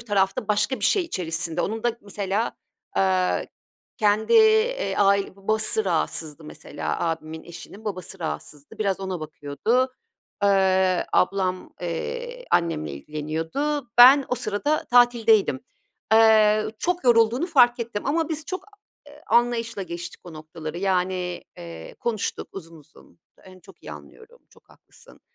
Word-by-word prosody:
taraf 195 Hz, -4 st, 0 dB
da 215 Hz, -, -5 dB
başka 210 Hz, +5 st, +1 dB
bir -, -, -1 dB
şey 395 Hz, -, +3 dB
içerisinde. 165 Hz, -, -2 dB
Onun 220 Hz, +4 st, -3 dB
da 240 Hz, -1 st, -1 dB
mesela, 200 Hz, +2 st, -3 dB, 0.4 s
aaa, 185 Hz, -, +1 dB, 0.6 s
kendi, 210 Hz, +1 st, +1 dB
iii, 450 Hz, +3 st, +4 dB
ai 200 Hz, -1 st, +2 dB
babası 215 Hz, +2 st, 0 dB
rahatsızdı 160 Hz, -3 st, -2 dB
mesela. 150 Hz, -, -5 dB
Abimin 160 Hz, -1 st, -4 dB
eşinin 185 Hz, +5 st, -12 dB
babası 190 Hz, -2 st, -6 dB
rahatsızdı. 150 Hz, -3 st, -7 dB
Biraz 195 Hz, -3 st, -1 dB
ona 190 Hz, -3 st, -4 dB
bakıyordu. 155 Hz, -, -1 dB, 0.5 s
Iıı, 190 Hz, -2 st, +3 dB
ablam, 185 Hz, -1 st, 0 dB
iii, 485 Hz, -, -5 dB
annemle 165 Hz, -, 0 dB
ilgileniyordu. 160 Hz, -, -3 dB
Ben 265 Hz, +3 st, +9 dB
o 250 Hz, -, 0 dB
sırada 250 Hz, +7 st, -1 dB
tatildeydim. 230 Hz, -, +4 dB, 0.5 s
Eee, 215 Hz, -1 st, +5 dB
çok 360 Hz, -2 st, -1 dB
yorulduğunu 240 Hz, +5 st, +4 dB
fark 245 Hz, -7 st, +4 dB
ettim 230 Hz, -1 st, -4 dB
ama 320 Hz, +2 st, 0 dB
biz 315 Hz, -2 st, -4 dB
çok 370 Hz, 0 st, -5 dB
a 415 Hz, -, -21 dB, 0.4 s
e -, -, -16 dB
i 300 Hz, -, -19 dB
anlayışla 235 Hz, -3 st, +1 dB
geçtik 170 Hz, -1 st, -7 dB
o 175 Hz, -, -10 dB
noktaları. 155 Hz, +1 st, -8 dB
Yani, 180 Hz, -1 st, -1 dB
ııı, 85 Hz, -1 st, -10 dB
konuştuk 225 Hz, -3 st, -3 dB
uzun 165 Hz, -3 st, -10 dB
uzun. 155 Hz, +1 st, -20 dB, 0.3 s
Onu 185 Hz, 0 st, -15 dB
çok 195 Hz, -, -18 dB
iyi -, -, -8 dB
anlıyorum, 460 Hz, +2 st, -14 dB
çok -, -, -24 dB
haklısın. -, -, -20 dB
200 Hz, 135 wpm, -24 LUFS, 175-240 Hz, 0.6 s, Ben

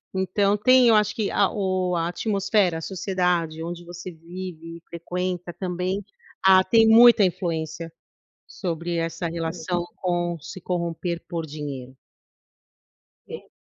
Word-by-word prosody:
Então 195 Hz, +2 st, +1 dB
tem, 255 Hz, +3 st, +5 dB
eu 225 Hz, -, +6 dB
acho 210 Hz, 0 st, +2 dB
que 215 Hz, -4 st, -1 dB
a 200 Hz, -, +3 dB
o 185 Hz, -3 st, -1 dB
a 165 Hz, 0 st, 0 dB
atmosfera, 195 Hz, -1 st, +1 dB
a 160 Hz, -, -6 dB
sociedade 180 Hz, -3 st, -1 dB
onde 175 Hz, +1 st, -6 dB
você 175 Hz, +1 st, -8 dB
vive 165 Hz, 0 st, -9 dB
e 170 Hz, -, -17 dB
frequenta 180 Hz, +1 st, -4 dB
também, 180 Hz, +2 st, -3 dB, 0.4 s
ah, 190 Hz, 0 st, +7 dB
tem 225 Hz, +2 st, +4 dB
muita 230 Hz, -1 st, +8 dB
influência 165 Hz, -2 st, -2 dB, 0.6 s
sobre 170 Hz, -2 st, -4 dB
essa 165 Hz, +1 st, -2 dB
relação 170 Hz, +1 st, -3 dB
com 175 Hz, -2 st, -1 dB
se 185 Hz, -, -9 dB
corromper 170 Hz, -1 st, -3 dB
por 165 Hz, -2 st, -3 dB
dinheiro. 140 Hz, -4 st, -7 dB, 1.3 s
É. -, -, -9 dB
175 Hz, 130 wpm, -24 LUFS, 165-190 Hz, 1.3 s, muita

